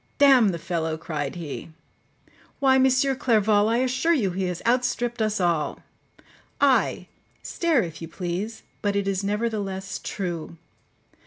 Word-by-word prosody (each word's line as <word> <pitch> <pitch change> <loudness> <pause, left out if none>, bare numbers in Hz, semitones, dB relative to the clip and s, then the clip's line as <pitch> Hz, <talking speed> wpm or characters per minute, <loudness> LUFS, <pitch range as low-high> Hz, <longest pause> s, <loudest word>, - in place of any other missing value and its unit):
"D—n 270 -5 +6
the 180 -3 0
fellow!" 160 -1 -2
cried 150 -2 -4
he; 165 -2 -6 0.9
"why, 265 -1 +4
M. 265 0 +5 0.3
Clerval, 215 -3 +3
I 230 - +2
assure 260 +7 +2
you 205 -10 0
he 190 +1 -2
has 180 -1 -4
outstript 240 -1 0
us 215 -1 0
all. 170 -4 0 0.8
Ay, - - +2 0.4
stare 325 -9 +1
if 165 -2 -8
you 165 - -5
please; 185 +6 -4 0.2
but 205 -1 0
it 200 -1 0
is 195 0 -1
nevertheless 200 -2 -2
true. 170 -4 -4
200 Hz, 140 wpm, -25 LUFS, 175-235 Hz, 0.9 s, D—n